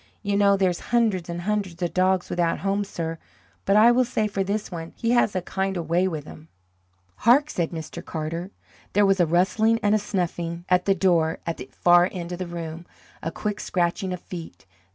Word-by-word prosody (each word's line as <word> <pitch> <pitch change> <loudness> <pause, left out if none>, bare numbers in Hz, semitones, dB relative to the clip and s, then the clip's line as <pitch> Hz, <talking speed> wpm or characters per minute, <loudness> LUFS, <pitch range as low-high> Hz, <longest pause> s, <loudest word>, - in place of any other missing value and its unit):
You 200 -1 0
know 200 -1 +4
there's 185 -3 +1
hundreds 215 -8 +1
and 170 0 -4
hundreds 195 -3 -2
of 175 - -2
dogs 185 0 +1
without 170 -1 0
homes, 200 +1 -1
sir. 165 -1 -4 0.5
But 195 - +3
I 220 +3 +7
will 250 +1 +4
say 235 -3 -1
for 195 -1 -1
this 205 +2 -3
one, 165 -1 -6
he 230 - -1
has 240 -4 +3
a 185 - -1
kind 190 0 -2
of 170 - -2
a - - -13
way 175 +3 +2
with 155 -5 -4
him." 155 +1 -12 0.7
"Hark!" 280 +6 +4
said 170 -2 -1
Mr. 165 +1 -7
Carter. 165 +3 -4 0.4
There 205 +1 +4
was 195 -1 +3
a 175 - +4
rustling 195 +7 +2
and 205 0 +3
a 215 - +4
snuffing 175 -4 -3
at 180 0 +3
the 195 - +3
door 170 -3 +2
at 165 - -3
the - - -9
far 175 +1 +4
end 175 -2 -6
of 175 - -5
the 185 - -3
room, 170 0 -7 0.3
a 165 - -2
quick 210 +4 -3
scratching 180 +2 -1
of 180 - -4
feet. 170 - -9
185 Hz, 215 wpm, -24 LUFS, 170-200 Hz, 0.7 s, I